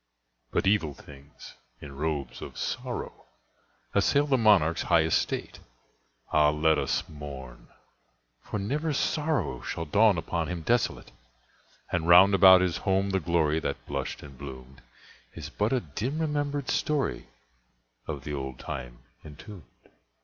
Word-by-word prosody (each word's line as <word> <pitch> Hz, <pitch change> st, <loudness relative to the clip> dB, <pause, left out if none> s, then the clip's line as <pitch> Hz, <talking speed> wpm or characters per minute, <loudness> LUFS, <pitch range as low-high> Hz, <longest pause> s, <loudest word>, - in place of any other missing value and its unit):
But -, -, 0 dB
evil 90 Hz, -8 st, +2 dB
things, 70 Hz, +1 st, -14 dB, 0.3 s
in 70 Hz, -2 st, -10 dB
robes 70 Hz, -4 st, -3 dB
of -, -, -9 dB
sorrow, -, -, -5 dB, 0.7 s
Assailed 145 Hz, 0 st, +2 dB
the 135 Hz, -, +5 dB
monarch's 95 Hz, -8 st, +4 dB
high 85 Hz, -2 st, +3 dB
estate. 80 Hz, -, -1 dB, 0.7 s
(Ah, 75 Hz, -1 st, +5 dB
let 80 Hz, +1 st, +2 dB
us -, -, -1 dB
mourn!—for 65 Hz, -, -11 dB
never 145 Hz, +10 st, -2 dB, 0.2 s
morrow 150 Hz, -, -1 dB
Shall 80 Hz, -, -4 dB
dawn 100 Hz, +4 st, +4 dB
upon 80 Hz, 0 st, -2 dB
him 90 Hz, -2 st, -5 dB
desolate!) 120 Hz, +4 st, 0 dB, 0.8 s
And 85 Hz, -2 st, -1 dB
round 90 Hz, +3 st, +8 dB
about 95 Hz, -1 st, +8 dB
his 90 Hz, -2 st, 0 dB
home 95 Hz, +1 st, 0 dB
the 95 Hz, -, +1 dB
glory 80 Hz, -2 st, +1 dB
That -, -, -4 dB
blushed -, -, -4 dB
and 70 Hz, -2 st, -12 dB
bloomed, 65 Hz, -1 st, -10 dB, 0.5 s
Is 75 Hz, -2 st, -8 dB
but 105 Hz, +6 st, -1 dB
a 130 Hz, -2 st, +1 dB
dim 110 Hz, -, -4 dB
remembered 145 Hz, -3 st, -2 dB
story 150 Hz, -2 st, -1 dB, 0.8 s
Of 75 Hz, -5 st, -5 dB
the 75 Hz, -, -5 dB
old 65 Hz, -2 st, -5 dB
time -, -, -7 dB, 0.2 s
entombed. 80 Hz, +4 st, -13 dB
80 Hz, 135 wpm, -27 LUFS, 70-105 Hz, 0.8 s, round